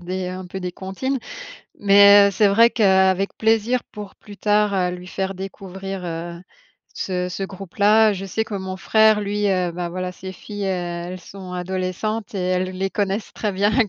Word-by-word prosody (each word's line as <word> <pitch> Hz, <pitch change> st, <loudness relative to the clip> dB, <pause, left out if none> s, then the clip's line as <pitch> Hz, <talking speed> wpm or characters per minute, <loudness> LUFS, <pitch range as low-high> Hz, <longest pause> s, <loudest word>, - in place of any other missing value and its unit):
des 185 Hz, +1 st, -4 dB
un 185 Hz, 0 st, -6 dB
peu 190 Hz, +2 st, -7 dB
des 180 Hz, -1 st, -3 dB
comptines, 230 Hz, +9 st, -3 dB, 0.6 s
mais, 200 Hz, 0 st, +7 dB
heu, -, -, -1 dB
c'est 205 Hz, +2 st, +3 dB
vrai 230 Hz, +4 st, +5 dB
qu'avec 190 Hz, -3 st, +2 dB
plaisir 225 Hz, +2 st, +2 dB
pour 210 Hz, -2 st, -10 dB
plus 205 Hz, -1 st, -13 dB
tard, 210 Hz, 0 st, +2 dB
heu, 180 Hz, -2 st, +1 dB
lui 180 Hz, 0 st, -10 dB
faire 190 Hz, +1 st, -3 dB
découvrir, 195 Hz, 0 st, -7 dB
heu, 170 Hz, 0 st, -5 dB, 0.6 s
ce 180 Hz, -1 st, -2 dB
ce 180 Hz, +2 st, -5 dB
groupe-là. 205 Hz, +3 st, +2 dB
Je 195 Hz, -1 st, -5 dB
sais 220 Hz, +3 st, -2 dB
que 220 Hz, -, -7 dB
mon 190 Hz, -1 st, -4 dB
frère 220 Hz, +2 st, +4 dB
lui, 205 Hz, 0 st, -1 dB
heu, 180 Hz, -3 st, 0 dB
bah, 175 Hz, 0 st, -4 dB
voilà, 180 Hz, +1 st, -4 dB
ses 190 Hz, +1 st, -8 dB
filles 205 Hz, +2 st, -8 dB
elles 175 Hz, -1 st, -3 dB
sont 185 Hz, -1 st, -10 dB
adolescentes, 185 Hz, +4 st, -3 dB
et -, -, -2 dB
elles 185 Hz, 0 st, 0 dB
les 190 Hz, +1 st, -3 dB
connaissent 200 Hz, +1 st, -2 dB
très 210 Hz, -, -2 dB
bien, 200 Hz, +2 st, +1 dB
elles 230 Hz, -5 st, +3 dB
195 Hz, 185 wpm, -21 LUFS, 185-205 Hz, 0.6 s, mais